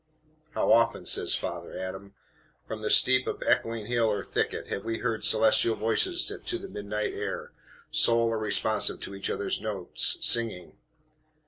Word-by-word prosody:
"'How - - +1
often,' 115 0 +3
says - - +3
Father - - -6
Adam, 95 +2 -7 0.5
'from 110 -1 -7
the 105 - -2
steep 130 0 +5
of - - -4
echoing 115 -2 0
hill 120 0 +1
or 105 -1 -1
thicket, - - -3
have 100 - -4
we 115 0 -3
heard 115 -3 -3
celestial 110 +1 +3
voices 350 - +1
to 355 - -2
the - - -9
midnight 105 +1 -4
air, - - -5 0.4
sole, 115 0 +3
or 115 -1 -2
responsive 110 0 0
to 100 - -8
each 100 0 -5
other's 100 - -2
notes, 105 -5 0
singing!' 115 -7 +2
110 Hz, 155 wpm, -27 LUFS, 105-115 Hz, 0.5 s, steep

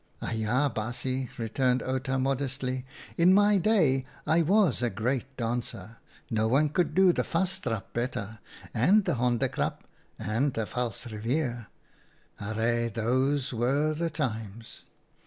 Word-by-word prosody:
" - - -36
Aja, 115 +5 0
baasje," 125 +3 -3
returned 125 +3 0
Outa, 130 0 -1
modestly; 130 -1 -1 0.2
" - - -17
in 180 +3 +6
my 205 0 +5
day 165 -10 +3 0.2
I 165 +2 +3
was 180 - +3
a 120 - +1
great 125 +6 -2
dancer. 115 -3 -4 0.3
No 110 -1 +2
one 140 +6 +3
could 155 0 0
do 190 -1 +6
the - - +1
Vastrap 165 - -2
better 115 -3 -3 0.2
— - - -17
and 205 +2 +5
the - - +1
Honde 120 -1 +1
krap - - -2 0.2
— - - -38
and 120 +7 0
the 110 - -1
Valsrivier. 120 +2 -3 0.7
Arre, 115 +3 0
those 130 +5 0
were 140 +6 +1
the 165 +2 -1
times 115 -7 -5
130 Hz, 140 wpm, -28 LUFS, 115-145 Hz, 0.7 s, in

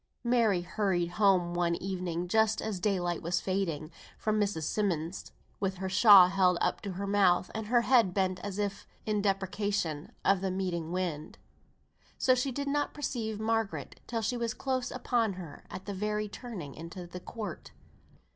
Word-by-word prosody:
Mary 230 -6 +3
hurried 175 -1 0
home 180 -3 +3
one 175 -1 +1
evening, 180 -2 -3
just 220 +2 +3
as 215 -4 -3
daylight 180 -4 0
was 175 +2 0
fading, 170 -5 -2 0.3
from 215 0 0
Miss 205 -4 0
Simmonds', 175 -4 -2 0.3
with 195 -1 -1
her 190 +1 -4
shawl 190 -1 +8
held 185 -2 +3
up - - 0
to 200 -2 -5
her 195 +3 -4
mouth, 195 -3 +3
and 220 -1 -4
her 240 +1 +4
head 235 -5 +4
bent 185 -1 0
as 205 -1 -5
if 205 -1 -3 0.2
in 210 -1 0
deprecation 195 -5 -1
of 195 -1 +4
the 195 - 0
meeting 180 -3 -2
wind. 175 -5 -3 0.8
So 255 - +4
she 255 +2 0
did 280 +3 -3
not 290 +1 0
perceive 230 -7 -3
Margaret 225 -1 -2
till, 230 -2 -2
she 245 +3 0
was 235 -1 -2
close 260 -2 -1
upon 240 -4 0
her 175 -5 -10
at 185 - -8
the 205 - -4
very 210 +2 -1
turning 205 - -7
into 170 +2 -8
the 175 +1 -8
court. 205 -2 -7
195 Hz, 170 wpm, -30 LUFS, 180-220 Hz, 0.8 s, shawl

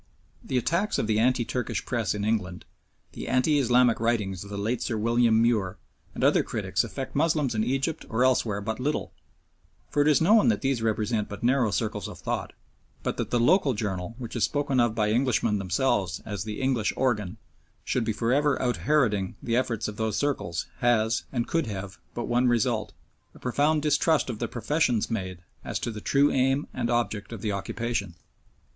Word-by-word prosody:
The 130 - -1
attacks 170 - 0
of - - 0
the 110 0 +1
anti 120 0 +2
Turkish 125 0 -3
Press 115 -5 -1
in 105 0 -2
England, 95 -5 -2 0.5
the - - -7
anti 145 +4 +3
Islamic 125 -2 +4
writings 105 -6 0
of 100 - -11
the 100 - -5
late 110 +5 -1
Sir 110 - -1
William 115 +1 +3
Muir 110 -5 +1 0.4
and - - -3
other - - +5
critics - - -1
affect 135 - -6
Moslems 150 -4 +2
in 110 -1 0
Egypt 135 +6 -1
or 115 +3 +1
elsewhere 115 -5 +2
but 110 +3 -3
little, 145 +4 -2 0.8
for 145 - +2
it 145 - +3
is 150 -3 +5
known 210 +7 +5
that 230 - +2
these 135 -3 0
represent 110 -1 0
but 100 - -8
narrow 125 -1 +3
circles 105 -2 -2
of - - -9
thought, - - -3 0.5
but - - -2
that - - -2
the 120 - +1
local 145 - +3
journal 100 0 -3
which 120 -2 -7
is 120 - 0
spoken 145 -3 +1
of 120 -2 +2
by 105 -2 +1
Englishmen 115 -3 +1
themselves 95 -1 0
as 100 -2 -4
the 105 -1 -5
"English 130 -5 +1
organ" 110 -8 0 0.5
should 125 - 0
be 115 - 0
for 115 +3 0
ever 145 0 +2
out 125 -1 0
Heroding 110 -11 +1
the 115 - 0
efforts 115 -4 0
of 105 -1 -7
those 110 -2 -1
circles 105 - -1
has, 115 -2 +2
and 120 -3 -1
could 165 -6 0
have, 100 -2 -6 0.2
but 120 - -3
one 125 +1 +2
result 120 -2 +1 0.4
a - - -14
profound 145 +4 +1
distrust 150 -1 +2
of 110 - -7
the 120 - -1
professions 120 0 0
made 95 -5 -4 0.2
as - - -3
to 120 - -3
the 105 -1 -7
true 140 +5 +3
aim 135 +2 +1
and 120 -2 -2
object 115 -4 -1
of 115 -4 -7
the 105 - 0
occupation. 105 -2 -3
120 Hz, 195 wpm, -27 LUFS, 105-130 Hz, 0.8 s, other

